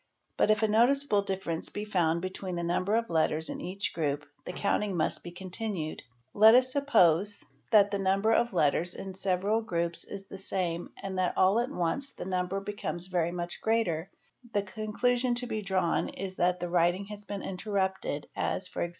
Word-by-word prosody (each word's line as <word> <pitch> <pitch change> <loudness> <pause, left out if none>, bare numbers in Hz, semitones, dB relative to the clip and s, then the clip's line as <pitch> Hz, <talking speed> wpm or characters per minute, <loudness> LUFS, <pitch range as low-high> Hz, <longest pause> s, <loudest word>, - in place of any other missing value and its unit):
But - - +2
if 215 0 +3
a - - +5
noticeable 235 +1 +3
difference 190 -4 -3
be 210 - -5
found 170 -4 +1
between 185 0 -4
the 170 - -2
number 180 +4 +1
of 230 -4 0
letters 160 0 +1
in - - -5
each 190 +3 -3
group, 150 -2 -1 0.2
the - - -4
counting 200 0 0
must 155 - +1
be 175 - -6
continued; 185 -2 -5 0.3
let 220 +2 +8
us 255 0 +5
suppose 205 - +3 0.2
that 205 -3 +5
the 200 - -1
number 195 +3 +2
of 240 +1 +2
letters 170 0 +1
in 195 -1 -6
several 195 +3 0
groups 170 -5 -1
is 195 -1 -8
the 195 - -10
same 175 -3 -2
and 190 -1 -3
that 185 - 0
all 190 +4 +4
at 240 +2 -1
once 220 - -1
the - - -7
number 185 +1 -1
becomes 195 -3 -4
very 175 -2 0
much 175 0 -5
greater, 195 -7 0 0.4
the 205 - +1
con 215 +2 -6
clusion 245 +2 +2
to 245 +1 -4
be 220 -3 -3
drawn 190 -4 0
is 190 0 -6
that 180 +1 +2
the 175 0 -3
writing 175 +2 +2
has 210 0 -9
been 200 -1 -6
interrupted 190 -5 -2
as 185 - -1
e.g. 170 - -1
190 Hz, 190 wpm, -29 LUFS, 175-210 Hz, 0.4 s, let